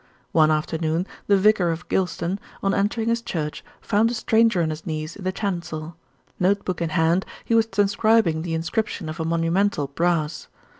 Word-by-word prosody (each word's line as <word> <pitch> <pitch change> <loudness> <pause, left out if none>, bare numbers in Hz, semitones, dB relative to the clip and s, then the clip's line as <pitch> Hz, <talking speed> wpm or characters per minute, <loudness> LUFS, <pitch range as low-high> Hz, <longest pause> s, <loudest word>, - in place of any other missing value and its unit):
One 155 -1 +5
afternoon 160 +2 0 0.2
the 200 - +5
vicar 195 -3 +4
of 165 +1 -4
Gylston, 185 0 -1 0.2
on 195 0 +2
entering 220 +4 0
his 230 0 +1
church, 160 -10 -4 0.2
found 220 +2 +2
a 240 - -2
stranger 225 -6 +3
on 160 - 0
his 155 +1 -6
knees 155 -1 -4
in 200 - -10
the 185 - 0
chancel. 170 -5 -4 0.4
Note 195 +2 +2
book 180 -2 -3
in 165 - 0
hand, 165 +4 +2 0.2
he - - 0
was 225 -1 +4
transcribing 205 -4 +2
the 165 -1 -2
inscription 170 0 -2
of 155 +2 -6
a 160 - -1
monumental 165 +1 +1
brass. 155 +1 -1
175 Hz, 180 wpm, -23 LUFS, 160-205 Hz, 0.4 s, One